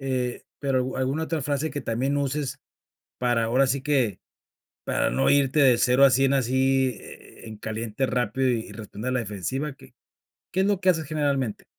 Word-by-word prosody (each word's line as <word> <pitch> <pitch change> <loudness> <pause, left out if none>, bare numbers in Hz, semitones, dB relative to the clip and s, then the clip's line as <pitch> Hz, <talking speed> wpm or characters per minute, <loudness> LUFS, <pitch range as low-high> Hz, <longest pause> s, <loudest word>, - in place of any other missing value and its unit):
Eh, 130 -2 -2 0.2
pero, 135 -2 0
¿au 130 +1 -3
alguna 135 +4 -1
otra 160 -1 -2
frase 145 +3 -1
que 145 - -4
también 130 +5 -1
uses 140 -1 -2 0.6
para 120 -2 +1
ahora 125 +4 +3
así 135 +1 0
que 130 -7 0 0.6
para - - 0
no 135 - +1
irte 140 +1 +3
de 125 -4 +5
0 130 +2 +5
a 135 - +5
100 135 +1 +3
así 130 +1 +2
e - - -13
e - - -9
en 110 -1 -8
caliente 110 +3 -3
rápido 125 0 0
y 115 -2 -2
responder 110 +2 -6
a - - -1
la 125 - +1
defensiva? 115 - -4
¿Qué 130 -2 -18 0.6
qué 190 - 0
es 190 - +3
lo 200 -2 +1
que 185 - +4
haces 160 -4 -1
generalmente? 140 -7 -1
130 Hz, 195 wpm, -25 LUFS, 120-140 Hz, 0.6 s, de